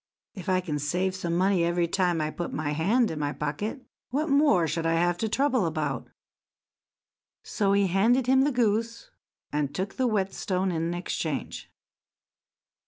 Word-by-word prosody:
If 190 -2 -7
I 185 0 +2
can 155 -5 -3
have 180 +6 0
some 170 -3 -2
money 185 0 +2
every 170 0 +1
time 175 -2 +1
I 155 0 -1
put 175 - -5
my 150 -1 -2
hand 205 +11 +2
in 155 - -5
my 145 -1 -1
pocket, 205 - -4 0.2
what 300 +5 -1
more 280 - +4
should 165 +2 -1
I 165 - +2
have 175 +1 +2
to 220 - -1
trouble 260 -5 +1
about?" 150 -5 -3 1.3
So 200 -2 0
he 200 0 +3
handed 225 +8 +3
him 265 +1 +4
the 290 +2 +2
goose, 230 -1 -1 0.4
and 145 -1 -2
took 190 +1 -3
the 260 -1 +2
whetstone 190 -3 -1
in 165 +1 -1
exchange. 165 -3 -4
185 Hz, 165 wpm, -27 LUFS, 165-220 Hz, 1.3 s, more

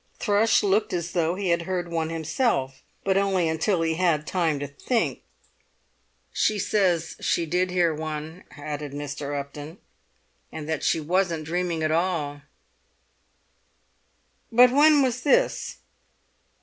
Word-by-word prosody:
Thrush 215 +1 +3
looked 205 +2 +1
as 170 -1 -2
though 170 0 0
he 195 -1 -2
had 170 0 +2
heard 175 0 -3
one 165 -1 -1
himself, 155 - -1 0.2
but 190 0 +2
only 195 -3 +2
until 165 +3 0
he 160 0 +1
had 160 -3 +1
time 165 -3 0
to 145 - -3
think. 220 - -2 1.1
"She 215 - +1
says 185 -5 +1
she 170 - +1
did 180 +3 0
hear 175 -3 +2
one," 155 +2 -6
added 145 -1 -6
Mr. 145 0 -4
Upton, 145 +4 -8 0.7
"and 150 -1 -7
that 160 0 -2
she - - +2
wasn't 170 0 0
dreaming 170 0 -2
at 155 - +1
all." 160 -4 -1 2.1
"But 245 +2 +7
when 290 +1 +5
was 255 -1 -1
this?" 480 - +1
170 Hz, 135 wpm, -25 LUFS, 155-190 Hz, 2.1 s, But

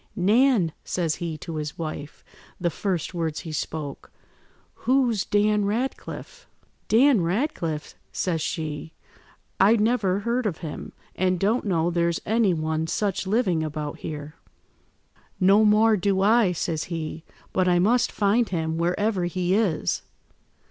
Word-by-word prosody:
"'Nan,' 210 -1 +3
says 165 -3 -1
he 165 -2 -4
to 160 +1 -6
his 150 -1 -4
wife, 155 -2 -6 0.3
the 175 -2 0
first 185 0 -2
words 165 -3 -2
he 165 - -7
spoke, 150 -2 -5 0.6
'who's 245 -4 +1
Dan 210 0 +2
Ratcliffe?' 260 - -4 0.4
"'Dan 245 -1 +5
Ratcliffe,' 170 - -2 0.2
says 165 -4 -1
she. 155 0 -4 0.7
'I 205 +4 +6
never 210 -4 +1
heard 235 +2 0
of 170 -6 -3
him, 150 - -6 0.2
and 185 -1 +1
don't 220 +6 +1
know 175 -3 +1
there's 170 -1 +1
any 220 -2 +3
one 160 -1 -1
such 195 +1 -1
living 190 -6 +1
about 150 -1 -4
here.' 150 -1 -6 1.1
"'No 195 +3 +5
more 215 +1 +5
do 195 0 +1
I,' 215 -1 +4
says 160 -2 -2
he, 165 -1 -5 0.3
'but 185 -1 +2
I 175 -1 +4
must 230 +7 +3
find 215 +3 +2
him 160 -2 -2
wherever 180 +2 0
he 180 +1 -1
is. 200 -7 +1
185 Hz, 135 wpm, -25 LUFS, 160-215 Hz, 1.1 s, I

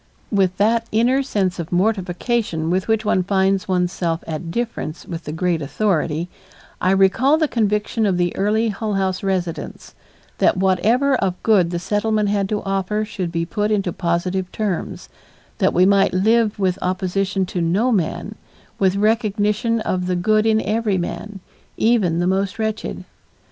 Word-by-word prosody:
With 190 -3 +1
that 230 +3 +2
inner 245 +5 +3
sense 195 -9 -1
of 165 -1 -5
mortification 185 -2 0
with 185 +1 0
which 220 -1 +1
one 185 - +2
finds 190 0 +1
one's 180 -2 +1
self 165 -2 -2
at 160 +1 -5
difference 220 -6 -4
with 170 -1 -7
the 150 - -4
great 170 0 -1
authority, 165 0 -1 0.5
I 185 - +2
recalled 195 +10 +3
the 310 - +3
conviction 210 -1 0
of 185 -3 +1
the 175 -1 0
early 215 +3 +1
Hull 210 0 -3
House 190 -1 -1
residents; 185 -4 -3 0.5
that - - +3
whatever 210 +9 +2
of 190 -4 -1
good 195 -6 +4
the 175 - -2
Settlement 210 +3 0
had 200 -1 0
to 210 -1 -2
offer 195 +2 -1
should 185 -5 -4
be 165 0 -1
put 210 +4 -1
into 195 -5 0
positive 180 +1 -1
terms, 205 -5 -3 0.5
that - - +3
we 180 +2 +4
might 195 -1 +3
live 220 +3 +2
with 190 -2 0
opposition 190 +1 -1
to 180 -1 -3
no 195 +10 +1
man, 180 0 -1 0.5
with 190 -1 +2
recognition 215 +1 +1
of 180 -3 -2
the 180 - 0
good 215 +5 +2
in 220 0 +3
every 215 -2 0
man, 195 +3 -5 0.4
even 215 -8 +2
the 175 - +1
most 190 +2 0
wretched. 220 -1 -3
195 Hz, 165 wpm, -20 LUFS, 180-215 Hz, 0.5 s, good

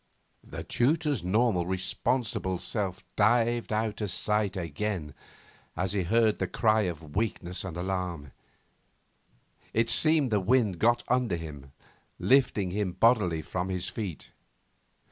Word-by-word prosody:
The - - -7
tutor's 145 - +1
normal 105 0 +2
and 85 - -4
responsible 95 +1 -1
self 100 -1 -3
dived 120 0 +2
out 110 0 -1
of 105 - -1
sight 105 +2 0
again 85 -2 -3 0.6
as 95 +1 -1
he 100 - +1
heard 110 +4 +2
the 95 - 0
cry 110 +3 +2
of 80 -3 -9
weakness 100 -4 -2
and 90 -3 -6
alarm. 90 -6 -3 1.4
It 115 +1 +2
seemed 155 -1 +3
the 105 - +3
wind 105 -3 +2
got 120 +1 +3
under 125 -6 +1
him, 75 -5 -8 0.5
lifting 125 -8 +2
him 100 -2 -1
bodily 95 -6 +3
from 90 +1 -3
his 95 -1 -1
feet. 100 -8 -6
100 Hz, 130 wpm, -28 LUFS, 90-115 Hz, 1.4 s, seemed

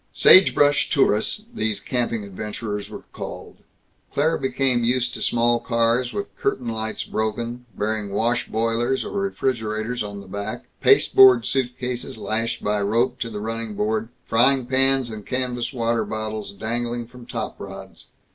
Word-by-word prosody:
"Sagebrush 145 -6 +6
Tourists" 135 - +2
these 110 - -1
camping 115 -1 -2
adventurers 105 +1 -5
were - - -9
called. - - -8 0.5
Claire 155 +3 +2
became 130 -2 +1
used 125 +1 +1
to - - -6
small 120 0 +2
cars, 115 +1 +1
with 200 0 -5
curtain 130 -12 -1
lights 110 -1 -3
broken, 115 +3 -3
bearing 105 -1 -2
wash 120 +4 0
boilers 115 +3 0
or - - -6
refrigerators 125 - -2
on 100 -1 -5
the 100 - -11
back, 100 +3 -5 0.2
pasteboard 395 - +6
suitcases 125 -1 -2
lashed 110 +2 -2
by 105 0 0
rope 120 +5 +1
to 115 - -3
the 105 -2 -5
running 115 0 -4
board, 110 +2 -1 0.2
frying 130 +3 +3
pans 135 -1 +2
and 105 -2 -8
canvas 125 -2 -2
water 115 -3 0
bottles 110 -1 -4
dangling 120 +3 -3
from 120 0 -14
top - - -5
rods. - - -9
115 Hz, 145 wpm, -23 LUFS, 110-125 Hz, 0.5 s, Sagebrush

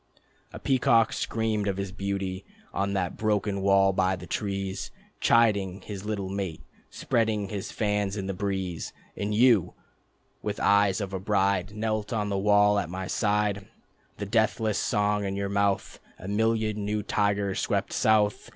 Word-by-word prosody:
A - - -8
peacock 115 -4 +3
screamed 110 -2 -1
of 95 -1 -1
his 100 -1 -3
beauty 95 -1 -3 0.3
On 100 0 -1
that 95 -2 -2
broken 105 -2 0
wall 95 0 +4
by 95 0 +2
the 90 0 -9
trees, 100 0 -3 0.3
Chiding 100 -5 +3
his 100 -1 -7
little 105 -3 -2
mate, 95 -4 -4 0.3
Spreading 110 -4 0
his 100 -1 -5
fans 105 -1 -1
in 95 - -3
the 95 - -2
breeze... 95 -3 -3 0.2
And 105 +1 -3
you, 115 -5 +4 0.7
with - - -3
eyes 100 -1 +3
of 100 -1 -4
a 95 - -2
bride, 100 0 0
Knelt 110 -1 -2
on 105 -2 -1
the 100 - -1
wall 105 0 +4
at 80 - -3
my 95 +1 -4
side, 105 -1 0 0.5
The 100 - -4
deathless 110 0 +1
song 105 0 +1
in 100 0 -2
your 100 0 -2
mouth... 100 -1 0 0.2
A 95 - -9
million 110 0 0
new 105 +1 -1
tigers 100 -2 0
swept - - -1
south 105 -1 +2
100 Hz, 160 wpm, -27 LUFS, 95-105 Hz, 0.7 s, wall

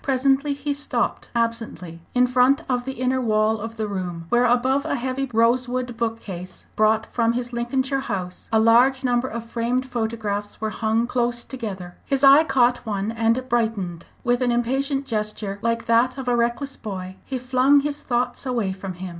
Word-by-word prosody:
Presently 275 +2 +2
he 285 +1 -2
stopped 285 +1 -2
absently 230 -8 -2 0.2
in 250 0 +5
front 250 +2 +3
of 245 -1 -1
the 265 - -3
inner 255 +1 0
wall 215 -1 +2
of 225 +1 -6
the 215 -1 -2
room, 180 -4 -4
where, 240 +1 +3
above 255 +3 +2
a - - -1
heavy 260 +1 -2
rosewood 245 +2 +1
bookcase, 210 -6 -5
brought 215 +1 +3
from 230 -1 +2
his 245 0 -3
Lincolnshire 260 +3 0
house, 190 -8 -5
a - - +1 0.5
number 245 0 +1
of 235 -2 -5
large 230 - -19
framed 245 +2 0
photographs 220 -4 -3
were 220 0 -2
hung 220 +1 0
close 240 -1 -1
together. 195 -9 -7
His 275 0 -1
eye 280 +3 +8
caught 245 -4 +2
one 205 -1 -2
and 230 +3 0
brightened. 220 -8 -1 0.2
With 245 +1 +1
an 245 -1 +2
impatient 270 +4 0
gesture, 215 -4 -3
like 230 0 -1
that 235 +3 +3
of 265 -2 -6
a 245 - +3
reckless 240 +4 -1
boy, 190 -3 -6
he 265 - -4
flung 255 +3 +3
his 295 0 -3
thoughts 245 0 -1
away 235 -7 -1
from 190 0 -6
him. 180 +1 -7
240 Hz, 180 wpm, -23 LUFS, 220-255 Hz, 0.5 s, eye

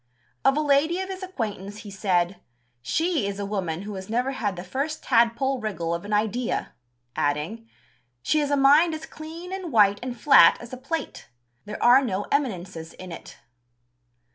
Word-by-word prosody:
Of 270 - +4
a - - +2
lady 300 +4 +2
of 380 0 -4
his 380 0 -6
acquaintance 215 - -5
he 205 - -8
said: 185 -2 0 0.4
"She 320 - 0
is 200 -1 -4
a 200 - -3
woman 190 -4 -3
who 210 +1 -6
has 190 0 -8
never 245 +4 0
had 205 -7 -2
the 175 - -7
first 275 - -3
tadpole 240 +2 +2
wriggle 175 -6 -2
of 170 +3 -4
an 205 - -7
idea," 220 +3 -1 0.4
adding, 160 +11 -2 0.5
"She 310 - +2
has 290 -1 0
a 285 - +2
mind 295 +5 +5
as 315 - -7
clean 330 +4 -9
and 375 -4 -5
white 205 -3 +4
and 245 -1 -6
flat 170 - +7
as 240 +1 -11
a - - -5
plate: 275 - -5 0.4
there 210 +1 -6
are 250 +3 +7
no 205 -5 -2
eminences 185 - -2
in 185 -1 -10
it." - - -10
230 Hz, 180 wpm, -25 LUFS, 195-290 Hz, 0.5 s, flat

